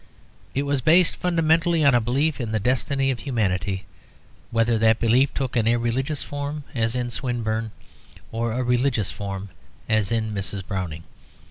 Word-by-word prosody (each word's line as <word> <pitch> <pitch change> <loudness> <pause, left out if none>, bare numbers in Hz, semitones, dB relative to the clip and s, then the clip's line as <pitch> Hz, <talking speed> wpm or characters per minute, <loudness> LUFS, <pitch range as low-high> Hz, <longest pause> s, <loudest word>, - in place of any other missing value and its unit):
It 140 - +1
was 140 -1 0
based 165 +5 +5
fundamentally 165 -1 +2
on 140 - +6
a 120 - +4
belief 140 +6 0
in 115 -2 -3
the 110 - +1
destiny 135 +4 +1
of 125 - -4
humanity, 100 -7 -1 0.6
whether 115 0 +2
that 110 0 +4
belief 125 +4 +3
took 130 -2 -3
an 115 -2 +2
irreligious 120 +5 0
form, 145 +1 -5
as 115 -1 0
in 120 -1 -2
Swinburne, 115 -3 -2 0.6
or 115 +1 -1
a 125 +3 -1
religious 125 -4 +1
form, 100 -1 -5 0.4
as 110 -2 +1
in 110 -2 0
Mrs. 100 -1 -3
Browning. 90 -5 -4
120 Hz, 155 wpm, -24 LUFS, 110-140 Hz, 0.6 s, on